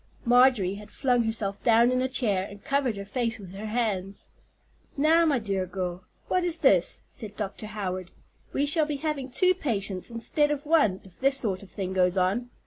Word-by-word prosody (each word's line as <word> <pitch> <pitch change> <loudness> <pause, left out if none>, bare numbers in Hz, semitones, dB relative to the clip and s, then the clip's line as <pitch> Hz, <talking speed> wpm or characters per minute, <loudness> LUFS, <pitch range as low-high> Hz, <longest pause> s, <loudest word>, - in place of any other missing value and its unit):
Marjorie 245 -6 +4
had 210 +1 -10
flung 245 -2 +1
herself 210 -3 -1
down 235 +1 +4
in 255 0 +1
a 260 - +1
chair, 220 -8 +1
and 200 0 -13
covered 275 -6 0
her 200 - -6
face 230 +2 -1
with 190 -4 -11
her 205 +3 -6
hands. 205 -4 -2 0.7
"Now, 325 +3 +4
my 285 -3 +3
dear 195 -5 -2
girl, 180 0 -5 0.2
what 365 - +1
is 350 -1 0
this?" 190 - +3
said 210 -2 -8
Dr. 210 +1 -5
Howard. 185 -4 -4 0.4
"We 285 - 0
shall 305 +1 +3
be 300 - -2
having 280 -2 -3
two 365 +8 +3
patients 205 - -3
instead 240 +6 0
of 295 -1 -3
one 290 - +3
if 190 -3 -18
this 275 +1 +3
sort 200 -8 -2
of 200 - -13
thing 190 -2 -4
goes 180 0 +2
on. 200 +7 +1
225 Hz, 195 wpm, -27 LUFS, 195-270 Hz, 0.7 s, Marjorie